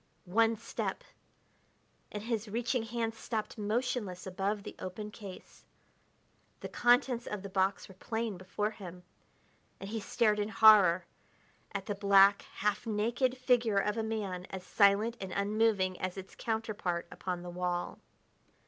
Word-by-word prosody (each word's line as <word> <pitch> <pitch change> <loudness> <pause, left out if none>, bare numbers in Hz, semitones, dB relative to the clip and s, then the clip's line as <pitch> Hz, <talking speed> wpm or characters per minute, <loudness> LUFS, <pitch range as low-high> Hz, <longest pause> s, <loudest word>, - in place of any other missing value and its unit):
One 225 +5 +3
step! - - -4 1.1
and 210 0 -5
his 225 -1 -2
reaching 240 +3 -1
hands 225 0 -3
stopped 220 0 -4
motionless 210 -3 -2
above 195 +2 -2
the - - -8
open 210 +3 -6
case. 200 -4 -11 1.0
The - - -5
contents 245 0 +3
of 210 -2 -4
the 200 - -6
box 190 0 0
were 190 - -13
plain 225 +2 -3
before 185 +4 -3
him 180 -4 -10 0.8
and 195 - -7
he 225 - -2
stared 210 0 +1
in 205 +1 -1
horror 200 -6 +6 0.7
at 200 -1 -4
the 205 - -2
black, 200 0 +5
half 210 +3 -1
naked 240 +4 0
figure 245 -4 +2
of 210 +1 +1
a 225 - -1
man 205 -5 -3
as 190 -1 -6
silent 210 +4 +3
and 190 -1 -5
unmoving 200 -2 +1
as 185 0 -3
its 190 0 -8
counterpart 215 -6 -2
upon 180 -2 -4
the 175 - -7
wall. 175 0 -2
210 Hz, 145 wpm, -32 LUFS, 190-225 Hz, 1.1 s, horror